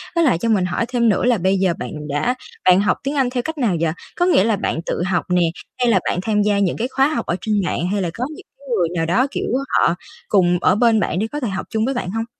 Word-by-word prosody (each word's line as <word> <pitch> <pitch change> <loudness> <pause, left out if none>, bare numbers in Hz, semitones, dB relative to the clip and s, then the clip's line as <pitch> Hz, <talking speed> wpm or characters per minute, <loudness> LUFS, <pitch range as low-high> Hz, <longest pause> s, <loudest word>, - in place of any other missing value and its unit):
Với 335 - +3
lại 255 - +3
cho 230 +7 -2
mình 200 -5 +2
hỏi 185 +6 -1
thêm 235 -2 +2
nữa 210 - +1
là 245 -2 +3
bây 190 +1 +1
giờ 185 -2 +2
bạn - - -5 0.2
đã 145 - 0 0.3
bạn 185 0 +6
học 200 - +1
tiếng 280 +2 -2
Anh 265 -3 +2
theo 250 0 -2
cách 320 +3 -5
nào 230 -10 +1
vậy? 165 -1 +1 0.2
Có 350 - +2
nghĩa 355 - +4
là 220 0 +2
bạn 180 - -2
tự - - -2
học 180 -2 0
nè, 180 0 +3 0.4
hay 245 -1 +2
là 195 - +4
bạn - - -1
tham 210 0 +1
gia 205 -1 +2
những 195 -4 0
cái 235 - -1
khóa 270 +1 +2
học 310 - -2
ở 170 - -1
trên 215 -1 0
mạng, 175 0 -1
hay 205 -1 0
là 175 - -1
có 235 - -4
những - - -13
cái 280 - -18
người 175 -3 +1
nào 165 -1 0
đó, 185 +11 +2
kiểu, - - -3
ơ, 275 +1 +1
họ - - +1 0.3
cùng 180 -3 +3
ở 185 - +4
bên 225 0 +3
bạn 180 -3 -1
để 220 - 0
có 295 - -3
thể 250 - -2
học 190 -1 -4
chung 220 -1 0
với 270 - 0
bạn 245 -8 -3
hông? 225 +2 -2
210 Hz, 300 wpm, -20 LUFS, 180-250 Hz, 0.4 s, bạn